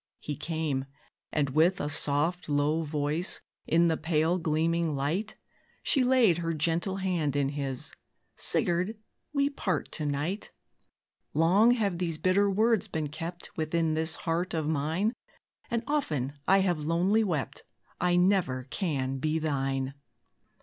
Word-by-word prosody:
He 150 - -5
came, 155 -3 -2 0.5
and, 145 -3 0
with 165 +6 +3
a - - -1
soft, 150 +3 +1
low 145 +2 +2
voice, 150 +2 -1 0.3
In 170 +1 +4
the 160 -1 +1
pale 160 +2 +1
gleaming 165 0 +1
light, 165 +11 -2 0.5
She 270 - +3
laid 245 -9 +4
her 165 -1 -1
gentle 170 +5 0
hand 175 -7 -1
in 140 -1 +1
his 140 -3 -4 0.4
"Sigurd, 180 +5 +1 0.3
we 280 -1 +2
part 190 - -2
to 155 - -3
night. 150 +8 -2 0.9
Long 185 +8 +5
have 200 -7 -1
these 170 -3 -1
bitter 195 +4 +3
words 220 +1 +2
been 155 -2 -3
kept 165 +3 -7
Within 160 0 0
this 160 +1 +1
heart 170 +2 -2
of 155 -2 -1
mine, 160 - 0 0.6
And 235 0 -1
often 155 - -1 0.2
have 190 -4 +3
I - - -6
lonely 175 +8 +2
wept, 165 -9 -2 0.4
I 180 0 +2
never 180 -8 +2
can 135 -8 -1
be 155 +3 0
thine." 135 -3 -1
165 Hz, 140 wpm, -29 LUFS, 150-185 Hz, 0.9 s, Long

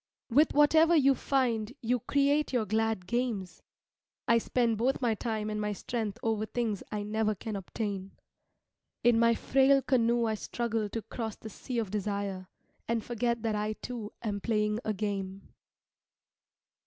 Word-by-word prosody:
With 290 +6 +4
whatever 315 +3 +6
you 275 -3 +5
find 250 -5 0
you 245 0 0
create 285 +5 +2
your 245 -4 +1
glad 220 -3 0
games, 220 -4 -2 0.7
I 230 0 +5
spend 230 -2 0
both 260 +3 +1
my 240 -3 +2
time 215 -1 -3
and 210 0 -2
my 210 0 -1
strength 215 0 -3
over 220 -1 0
things 225 -5 -2
I 210 -1 -2
never 215 0 0
can 215 +2 -5
obtain. 195 0 -4 0.9
In 235 -1 +5
my 230 0 +4
frail 270 +2 +3
canoe 235 -2 +2
I 220 - +1
struggle 225 0 -2
to 225 +1 -4
cross 225 -3 -5
the 220 - -10
sea 250 +3 -5
of 220 -5 -1
desire, 200 -2 -3 0.4
and 230 -1 0
forget 235 -1 -1
that 225 -1 0
I 210 +1 -1
too 225 -1 -6
am 205 -3 -2
playing 210 -1 0
a 215 - -1
game. 195 -1 -4
225 Hz, 155 wpm, -30 LUFS, 210-240 Hz, 0.9 s, whatever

